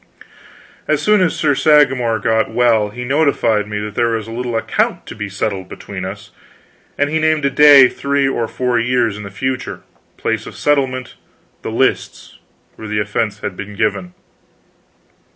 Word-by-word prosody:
As - - +1
soon 210 -2 +3
as 180 - +1
Sir 150 -2 +1
Sagramor 135 -6 +3
got 110 0 +1
well, 115 -2 +2
he 125 +4 -7
notified 125 -6 +1
me 105 0 -4
that 105 0 -6
there 115 0 +1
was 110 -1 -5
a - - -8
little 120 0 -4
account - - -1
to 105 -1 -6
settle 100 0 -3
between - - -8
us, - - -8 0.7
and 145 0 0
he 160 - +1
named 155 -2 +1
a 140 - +1
day 140 -1 +8
three 140 +1 -1
or 120 -4 -1
four 125 0 -1
years 115 -2 +1
in 105 - -8
the 100 - -8
future; 130 +6 -4 0.4
place - - -2
of - - -10
settlement, 130 -3 0 0.5
the - - -5
lists - - -2 0.4
where 110 - -8
the 105 +1 -3
offense 105 0 -2
had - - -4
been 100 +2 -8
given. 100 -4 -2
120 Hz, 170 wpm, -17 LUFS, 105-140 Hz, 0.7 s, day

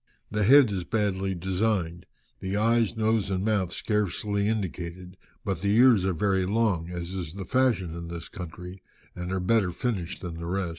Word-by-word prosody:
The 105 0 +1
head 135 -1 +7
is 95 -3 -2
badly 95 -1 -1
designed, 90 -1 -1 0.3
the 95 +1 -2
eyes, 115 +1 +2
nose, 110 -2 +1
and 95 0 -1
mouth 100 -5 +1
scarcely 105 0 -1
indicated, 90 -3 -4 0.3
but 80 - -2
the 100 +1 +2
ears 120 -5 +6
are 95 - +1
very 95 +1 +1
long, 100 -6 +1
as 90 0 -5
is 85 -4 -5
the 95 -1 -6
fashion 115 -9 +1
in 85 0 -6
this 85 -1 -6
country, 90 +1 -8 0.3
and 90 +1 -5
are 95 - 0
better 95 0 +2
finished 95 -3 -3
than 85 -2 -5
the 85 - -5
rest." 95 0 -1
95 Hz, 180 wpm, -27 LUFS, 90-105 Hz, 0.3 s, head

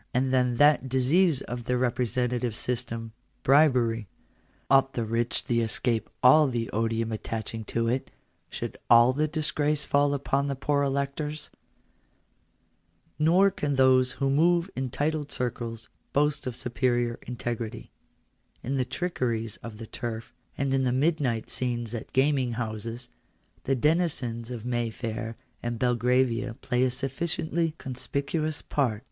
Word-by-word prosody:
And 130 +1 +1
then 125 -1 +2
that 145 0 +4
disease 135 +4 +3
of 120 -1 -6
the 125 0 +1
representative 125 -1 0
system 115 -1 -3 0.2
— - - -42
bribery; 125 -6 +4 0.6
ought 135 0 +4
the 115 - -1
rich 115 +2 -1
to 120 -1 +1
escape 115 0 -1
all 150 +4 +7
the 120 -3 -2
odium 115 +1 0
attaching 110 0 -4
to 115 +1 -1
it 125 +3 -1 0.2
— - - -44
should - - -6
all 120 +2 +7
the 150 +3 +1
disgrace 150 -1 0
fall 145 0 +2
upon 140 0 0
the 140 - -1
poor 140 +2 0
electors? 140 +2 -2 1.7
Nor 180 +6 +5
can 145 -6 -2
those 130 -1 +4
who 135 -1 0
move 170 +5 +3
in 130 0 -2
titled 150 +2 -2
circles 120 -2 -3 0.3
boast 150 -1 +1
of 125 - -3
superior 120 -1 0
integrity. 120 -2 -4 0.7
In 135 +3 -1
the 130 - +1
trickeries 120 - -2
of 115 -2 -9
the 115 - -7
turf, 115 0 -6 0.2
and 135 -1 0
in 135 0 +2
the 125 - +2
midnight 135 -4 +1
scenes 120 -2 -2
at 115 - -6
gaming 130 -2 +2
houses, 115 +1 -4 0.6
the 135 - +2
denizens 130 -6 0
of 120 -2 -6
Mayfair 115 -1 -3 0.2
and 120 0 -3
Belgravia 125 0 +1
play 125 +2 0
a 130 - +3
sufficiently 160 +5 -1
conspicuous 140 +4 -3
part. 120 -7 0
125 Hz, 140 wpm, -27 LUFS, 115-140 Hz, 1.7 s, all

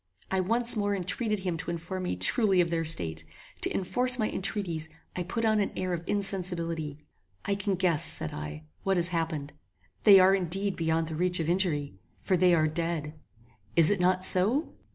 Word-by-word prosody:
I 190 - +1
once 230 +6 +2
more 205 -1 0
entreated 210 +3 -2
him 180 -3 -3
to 170 - -6
inform 170 +2 -5
me 180 - -2
truly 190 - +2
of 170 -1 +1
their 165 -1 0
state. 80 - 0 0.4
To - - +1
enforce 250 +6 +1
my 215 -3 -1
entreaties, 175 -5 -3 0.3
I 180 - -3
put 225 +6 -3
on 215 -1 +2
an 200 - -1
air 185 -1 -2
of 170 - -3
insensibility. 175 -6 -3 0.5
"I 200 - 0
can 195 0 -2
guess," 175 -3 +1
said - - +1
I, 75 +1 -7 0.2
"what 195 -1 0
has 175 0 +2
happened 160 -4 -3 0.5
They 200 -3 +8
are 185 +1 +5
indeed 195 +1 -1
beyond 160 0 -1
the 160 - -5
reach 180 +2 0
of 160 - -2
injury, 160 - -1 0.2
for 190 - 0
they 180 0 +4
are 155 -1 +2
dead! 160 -1 -3 0.6
Is 165 0 +7
it 205 - 0
not 185 +1 +3
so?" 220 - +5
180 Hz, 190 wpm, -28 LUFS, 165-195 Hz, 0.6 s, They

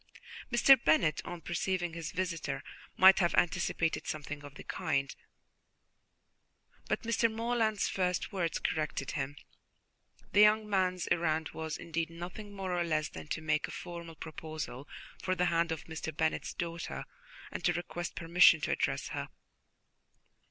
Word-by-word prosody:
Mr. 255 +1 +7
Bennet, 155 0 +3
on 175 -1 -6
perceiving 175 +1 -1
his 165 +1 -5
visitor, 165 -7 -2 0.3
might 190 +1 +8
have 175 -3 +2
anticipated 170 -1 +1
something 150 -1 -5
of 145 -1 -11
the - - -9
kind, 140 0 -1 1.7
but - - 0
Mr. 230 0 +2
Morland's 225 -2 +1
first 180 0 -1
words 175 -5 -1
corrected 150 -3 -2
him. 140 -1 -3 1.0
The 205 - +3
young 210 0 +6
man's 185 -3 +1
errand 160 -2 +1
was 160 -1 -4
indeed 165 0 -3
nothing 180 +5 -8
more 190 -2 -3
or 175 - +1
less 155 -2 0
than - - -9
to 155 - -3
make 155 -1 0
a - - -9
formal 170 -2 -7
proposal 155 -4 -6 0.3
for 185 - 0
the 180 - +2
hand 165 0 +2
of 160 - -3
Mr. 160 0 -5
Bennet's 160 +1 -1
daughter 170 -1 -4 0.5
and - - -5
to - - +4
request 175 0 -4
permission 170 -1 +6
to - - -1
address - - 0
her. - - -4
170 Hz, 145 wpm, -32 LUFS, 155-185 Hz, 1.7 s, might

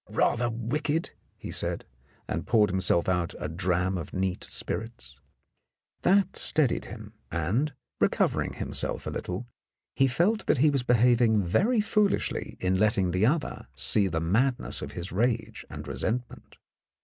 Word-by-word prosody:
"Rather 120 0 +1
wicked," 145 +8 -2 0.3
he - - -7
said, - - 0 0.4
and - - -3
poured 110 -3 +4
himself 90 -2 +2
out 90 -2 0
a - - -4
dram 90 +2 0
of 80 - -8
neat 95 -1 -1
spirits. 105 - -4 0.9
That 195 +1 +3
steadied 145 -6 +3
him, 110 0 -10 0.2
and, 100 - 0 0.3
recovering - - +1
himself - - -3
a - - -3
little, 90 +7 -4 0.5
he 135 - +4
felt 185 - +1
that - - +3
he 150 +3 +4
was 140 -2 +1
behaving 120 -3 +3
very 215 - +2
foolishly 210 -1 0
in 95 0 +1
letting 100 -4 +2
the 95 +5 +2
other 150 +3 -1
see 100 -2 +3
the 80 -3 -1
madness 115 +11 0
of - - -6
his 90 +2 -5
rage 115 +3 -1
and - - -8
resentment. 120 +2 -4
110 Hz, 145 wpm, -27 LUFS, 90-130 Hz, 0.9 s, poured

